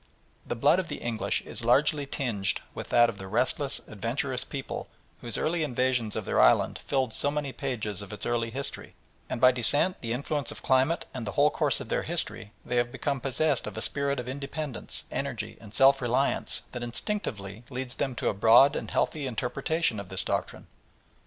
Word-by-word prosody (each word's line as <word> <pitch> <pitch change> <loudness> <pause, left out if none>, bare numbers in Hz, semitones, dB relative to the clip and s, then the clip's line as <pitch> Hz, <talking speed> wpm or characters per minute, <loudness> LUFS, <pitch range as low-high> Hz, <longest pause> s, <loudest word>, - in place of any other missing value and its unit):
The - - -2
blood 145 +9 +4
of 185 - -2
the - - -4
English 115 -2 -1
is - - -6
largely 140 +4 +3
tinged 105 -8 0
with - - -7
that 120 0 +6
of 115 -3 -5
the 95 - -7
restless, 130 +6 0
adventurous 125 +5 -1
peoples 135 -1 -5 0.3
whose 120 -3 -1
early 170 +1 0
invasions 125 -5 0
of - - -3
their - - +3
island - - +4
fill 130 -4 0
so 140 - 0
many 145 -2 -2
pages 110 -7 -3
of 100 - -8
its 105 - -5
early 120 -1 0
history, 135 +4 -5 0.3
and - - -3
by 130 +1 +7
descent, 135 +9 +1
the 115 - -4
influence 140 +2 -1
of - - -10
climate, 130 +5 +2
and 125 -5 -5
the 100 - -3
whole 145 +1 +4
course 145 -5 +1
of 130 -5 -8
their - - +1
history 135 -10 -4
they 125 - -1
have 120 0 +1
become 140 0 -2
possessed 140 +3 +1
of - - -6
a - - -2
spirit 140 -1 0
of 125 - -5
independence, 140 0 -4
energy, - - -3
and 110 -3 -12
self 135 +5 +5
reliance 125 +3 +1
that 125 - -5
instinctively 120 - -4
leads 125 -1 -4
them 130 -2 -2
to 110 - -2
a - - +2
broad 115 +8 +6
and - - -4
healthy 150 -3 0
interpretation 130 +2 -1
of 95 -2 -8
this 95 0 -1
doctrine. - - -2
130 Hz, 195 wpm, -28 LUFS, 115-140 Hz, 0.3 s, by